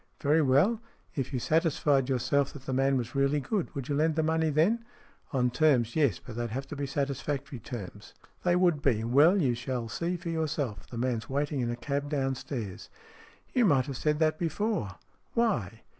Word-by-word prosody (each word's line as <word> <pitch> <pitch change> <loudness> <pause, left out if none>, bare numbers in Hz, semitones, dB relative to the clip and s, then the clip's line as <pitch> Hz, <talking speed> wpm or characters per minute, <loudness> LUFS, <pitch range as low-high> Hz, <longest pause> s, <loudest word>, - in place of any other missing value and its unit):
"Very 150 +3 +3
well. 150 - +3 0.3
If 135 -2 -3
you 130 - -1
satisfied 145 -2 +2
yourself 140 +2 +1
that 140 - -10
the 130 - -3
man 135 +1 +2
was 120 -2 -4
really 140 +2 +2
good, 190 +7 -2
would 135 -3 -4
you 145 - -1
lend 155 +2 +2
the 160 - +1
money 160 0 +1
then?" 175 +11 +2 0.5
"On 125 -4 +1
terms, 125 -5 +3
yes. 140 - +3
But 120 -2 -10
they'd 120 0 -2
have 135 +5 -4
to - - -5
be 140 0 -3
satis 140 -1 -2
factory 140 -2 -4
terms." 105 -4 -8
" - - -36
They 175 -1 +3
would 175 -5 +3
be. 115 -6 +2
Well, 145 - +5
you 135 -8 +2
shall 120 -1 -3
see 170 +9 -2
for 170 - -6
your 160 -1 0
self. 125 - -3
The 120 - -8
man's 120 -2 -1
waiting 145 +1 -1
in 120 - -1
a 120 - -1
cab 140 +3 -3
downstairs." 135 -7 -3 0.3
" - - -26
You 250 - +3
might 140 -9 +4
have 135 -3 -5
said 150 +2 +1
that 155 0 +1
before." 170 - -1 0.4
"Why? 120 - 0
140 Hz, 205 wpm, -29 LUFS, 125-155 Hz, 0.5 s, Well